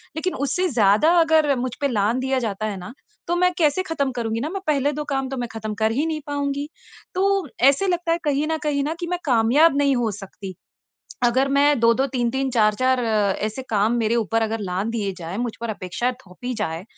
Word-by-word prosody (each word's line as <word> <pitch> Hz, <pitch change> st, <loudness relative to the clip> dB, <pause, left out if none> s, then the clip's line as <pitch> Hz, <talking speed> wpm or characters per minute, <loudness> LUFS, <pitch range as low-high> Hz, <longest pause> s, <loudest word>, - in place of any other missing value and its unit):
लेकिन 360 Hz, +3 st, -2 dB
उससे 360 Hz, +8 st, 0 dB
ज़्यादा 225 Hz, -, +4 dB
अगर 315 Hz, -4 st, +4 dB
मुझ 250 Hz, +1 st, -2 dB
पे 280 Hz, -, +2 dB
लाँघ 215 Hz, -2 st, +1 dB
दिया 265 Hz, 0 st, 0 dB
जाता 215 Hz, -3 st, -3 dB
है 210 Hz, -2 st, -3 dB
ना 180 Hz, +7 st, -9 dB, 0.3 s
तो 345 Hz, -, +1 dB
मैं 360 Hz, +1 st, +3 dB
कैसे 320 Hz, +2 st, +2 dB
ख़त्म 295 Hz, -7 st, -1 dB
करूँगी 230 Hz, -2 st, -2 dB
न 305 Hz, -, -3 dB
मैं 390 Hz, -, -4 dB
पहले 290 Hz, -1 st, +2 dB
2 300 Hz, -, -3 dB
काम 270 Hz, -2 st, -1 dB
तो 270 Hz, -, -4 dB
मैं 245 Hz, -, -2 dB
ख़त्म 220 Hz, -1 st, -4 dB
कर 220 Hz, 0 st, +2 dB
ही 280 Hz, +8 st, 0 dB
नहीं 315 Hz, -1 st, -2 dB
पाऊँगी 285 Hz, 0 st, -2 dB, 0.5 s
तो 390 Hz, -2 st, +1 dB
ऐसे 275 Hz, +9 st, +4 dB
लगता 350 Hz, -2 st, 0 dB
है 335 Hz, -, +2 dB
कहीं 295 Hz, 0 st, 0 dB
न 320 Hz, -, 0 dB
कहीं 290 Hz, -2 st, 0 dB
न 310 Hz, +3 st, -2 dB
कि 345 Hz, -, -4 dB
मैं 355 Hz, 0 st, -2 dB
कामयाब 265 Hz, +5 st, +4 dB
नहीं 280 Hz, -1 st, +3 dB
हो 240 Hz, -2 st, 0 dB
सकती। 195 Hz, -1 st, -9 dB, 0.7 s
अगर 255 Hz, +3 st, +3 dB
मैं 285 Hz, 0 st, +3 dB
2-2 230 Hz, +3 st, +3 dB
3-3 260 Hz, +1 st, -1 dB
4-4 250 Hz, +3 st, +2 dB
ऐसे 215 Hz, +1 st, 0 dB
काम 215 Hz, +2 st, +2 dB
मेरे 225 Hz, +1 st, +1 dB
ऊपर 225 Hz, 0 st, 0 dB
अगर 225 Hz, 0 st, -1 dB
लाँघ 190 Hz, +2 st, -2 dB
दिए 210 Hz, -4 st, -2 dB
जाएँ, 175 Hz, +3 st, -6 dB
मुझ 240 Hz, -1 st, -2 dB
पर 235 Hz, -, -3 dB
अपेक्षा 215 Hz, +4 st, -2 dB
थोपी 245 Hz, +7 st, -6 dB
जाए 170 Hz, -5 st, -3 dB
255 Hz, 210 wpm, -22 LUFS, 220-295 Hz, 0.7 s, ज़्यादा